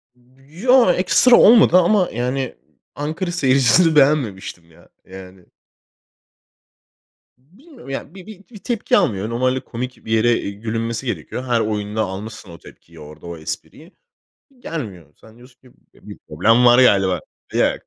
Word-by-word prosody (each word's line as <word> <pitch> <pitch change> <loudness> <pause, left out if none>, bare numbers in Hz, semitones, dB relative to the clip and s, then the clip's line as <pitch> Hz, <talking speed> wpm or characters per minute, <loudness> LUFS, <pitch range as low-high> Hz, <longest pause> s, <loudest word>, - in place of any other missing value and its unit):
B 125 +2 -29 0.2
ya, 250 -6 +5
ekstra 240 +7 +4
olmadı 220 -5 +6
ama 185 +1 +2
yani, 125 +2 -3 0.4
Ankara 160 +5 -4
seyircisini 140 +1 +3
beğenmemiştim 110 - 0
ya, - - -22 0.2
yani. 95 -1 -13 1.9
Bilmiyorum 215 - -18
ya, 135 +5 -7
bir 185 -2 -12
bir 210 -3 -12
bir 220 - -12
tepki 230 +2 -1
almıyor. 105 0 -1
Normalde 130 +2 -1
komik 125 +1 -8
bir 110 - -7
yere 115 +1 +2 0.2
gülünmesi 115 +4 -5
gerekiyor. 115 - -5
Her 120 -2 0
oyunda 105 0 -3
almışsın 105 0 -7
o 85 - -12
tepkiyi, 85 -1 -18
orada 75 +2 -13
o 85 -1 -8
espriyi. 150 - -9 0.7
Gelmiyor. 105 - -8
Sen 110 0 -20
diyorsun 125 +1 -20
ki: 130 - -21 0.2
"Bi - - -19
bir - - -10
problem 115 +10 +2
var 120 0 +6
galiba." 95 -6 +2 0.3
Yok, - - +1
120 Hz, 140 wpm, -19 LUFS, 105-155 Hz, 1.9 s, olmadı